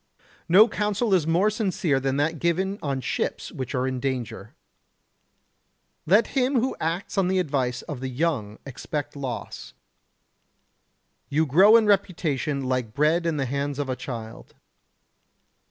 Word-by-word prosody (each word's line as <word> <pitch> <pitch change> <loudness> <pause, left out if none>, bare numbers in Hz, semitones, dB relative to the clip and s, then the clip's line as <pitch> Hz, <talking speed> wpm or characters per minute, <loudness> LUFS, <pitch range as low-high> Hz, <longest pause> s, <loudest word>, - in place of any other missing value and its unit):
No 200 +6 +8
counsel 210 0 -1
is 170 -5 +2
more 180 +6 +3
sincere 185 - 0
than 135 0 -1
that 160 +2 0
given 190 +5 0
on 135 -3 -2
ships - - -3
which 130 +1 -5
are 125 0 0
in 130 -1 -2
danger. 125 -6 -4 1.5
Let 210 +7 +4
him 260 -1 +2
who 260 +3 -1
acts 170 +5 -2
on 190 - +2
the 190 +1 +1
advice 135 -8 -1
of 145 -5 -6
the 130 0 -4
young 125 -7 -2
expect 145 +2 -5
loss. 130 -4 -6 1.6
You 155 +3 +2
grow 190 - +6
in 230 -1 +5
reputation 165 -8 0
like 125 -4 -2
bread 160 +4 +2
in 160 -2 -1
the 135 - 0
hands 140 +2 -3
of 145 -2 -3
a 130 - -1
child. 115 -3 -8
150 Hz, 145 wpm, -25 LUFS, 130-190 Hz, 1.6 s, No